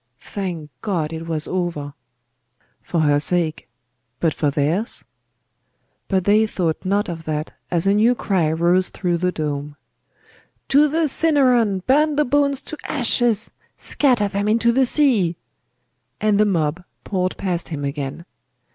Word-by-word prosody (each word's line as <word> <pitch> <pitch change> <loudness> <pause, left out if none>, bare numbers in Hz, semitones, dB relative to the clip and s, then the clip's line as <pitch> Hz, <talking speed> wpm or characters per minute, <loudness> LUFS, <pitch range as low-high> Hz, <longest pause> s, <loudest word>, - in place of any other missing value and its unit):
Thank 175 -7 -6
God 165 -7 -2
it 160 +1 -6
was 155 -2 -2
over! 170 -6 -3 0.9
For 170 - -1
her 145 -1 +3
sake 160 0 -1 0.5
but 165 -3 +1
for 150 - 0
theirs? 155 - -1 1.0
But 190 -2 +1
they 215 +3 +3
thought 170 -6 -2
not 200 +2 0
of 165 -2 -6
that 155 0 -3 0.2
as 170 0 0
a 195 - +4
new 225 +4 +3
cry 180 -9 0
rose 175 +3 +2
through 175 -2 -1
the 180 +1 0
dome. 145 -2 -4 0.9
'To 290 +2 +5
the 315 +2 +1
Cinaron! 255 - +3
Burn 300 +3 +3
the 300 +1 +2
bones 280 0 +1
to 310 - -6
ashes! 240 -5 +2 0.3
Scatter 245 -8 +1
them 200 +1 -2
into 230 +2 +3
the 260 +2 +3
sea!' 225 - +3 0.8
And 210 -1 +2
the 215 - +5
mob 165 -3 0 0.2
poured 185 -2 -2
past 180 -3 -3
him 145 -4 -4
again.... 140 +3 -5
185 Hz, 145 wpm, -21 LUFS, 160-230 Hz, 1.0 s, To